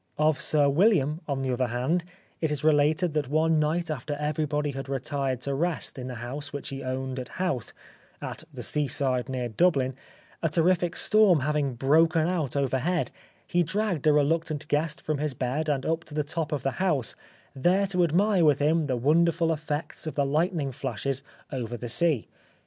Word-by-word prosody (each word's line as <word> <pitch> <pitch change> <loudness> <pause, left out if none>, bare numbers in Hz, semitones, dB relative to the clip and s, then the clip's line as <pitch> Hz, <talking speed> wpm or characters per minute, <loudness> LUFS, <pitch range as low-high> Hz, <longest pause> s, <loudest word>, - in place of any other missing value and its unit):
Of 155 -1 +2
Sir 145 -2 +4
William, 155 -1 +3
on 135 -2 -2
the 130 -1 0
other 125 0 0
hand, 130 +9 0 0.4
it 160 - 0
is 150 -1 -1
related 155 +2 +3
that 150 -4 0
one 155 +2 +2
night 160 +2 0
after 145 +1 -4
everybody 150 0 -1
had 135 0 -6
retired 135 -1 -2
to 140 - -1
rest 170 +3 -1
in 125 - -5
the 125 - -5
house 135 +5 -5
which 145 -1 -5
he 135 0 -6
owned 130 0 -3
at 125 - -6
Howth, 175 - -2 0.5
at - - -6
the - - -7
seaside 135 -3 +1
near 125 -2 -2
Dublin, 130 - +2 0.5
a 165 - +1
terrific 175 +2 +2
storm 210 -8 +4
having 145 -2 0
broken 160 +5 +3
out 160 -8 -1
overhead, 140 +6 0 0.3
he 175 - +1
dragged 175 -2 -1
a - - +7
reluctant 155 +1 +1
guest 150 +1 0
from 155 -2 -2
his 150 -3 -2
bed 135 +6 -2
and 135 -2 0
up 165 +1 0
to 150 - -10
the 150 - +1
top 155 +1 -3
of 145 -4 -2
the 135 - +1
house, 150 -11 0 0.4
there 180 +8 +2
to 180 -2 +1
admire 180 +3 +3
with 150 -3 +5
him 155 +2 +2
the 130 -2 0
wonderful 165 +5 +3
effects 150 0 -4
of 155 - -4
the 140 - +1
lightning 155 0 0
flashes 135 +1 -3 0.3
over 120 -3 -4
the 120 0 -6
sea. 150 -1 +3
150 Hz, 185 wpm, -27 LUFS, 135-165 Hz, 0.5 s, a